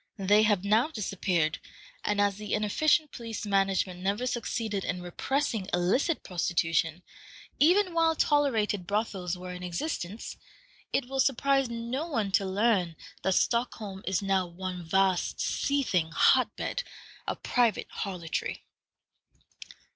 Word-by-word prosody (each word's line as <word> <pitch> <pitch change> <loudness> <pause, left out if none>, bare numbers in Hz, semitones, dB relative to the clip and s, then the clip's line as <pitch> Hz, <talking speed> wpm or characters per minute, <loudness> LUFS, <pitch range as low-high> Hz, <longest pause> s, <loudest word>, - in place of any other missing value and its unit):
They 205 +1 +4
have 210 -3 +2
now 215 +6 +3
disappeared, 185 - -1 0.4
and 205 0 0
as 200 -1 +2
the 210 -1 -2
inefficient 295 - +2
police 230 -3 -6
management 195 -2 +1
never 200 +6 -1
succeeded 225 -4 -2
in 180 -1 -3
repressing 220 +3 -1
illicit 195 - +1
prostitution, 165 -1 0 0.6
even 360 +4 +4
while 330 -1 +3
tolerated 225 - +1
brothels 195 -4 -1
were 180 0 -7
in 180 - -8
existence, 180 - -4 0.5
it 260 - 0
will 270 +1 -4
surprise 270 0 +2
no 235 +6 -3
one 225 -11 -1
to 195 0 +2
learn 190 -4 +1 0.3
that 190 0 +1
Stockholm 220 -5 0
is 190 +1 0
now 190 -2 +1
one 180 +1 -6
vast, 190 +2 +1
seething 255 - 0
hot 165 - +4
bed - - -2 0.5
of - - -4
private 240 -5 +2
harlotry. 180 -5 -4
205 Hz, 125 wpm, -29 LUFS, 180-245 Hz, 0.6 s, They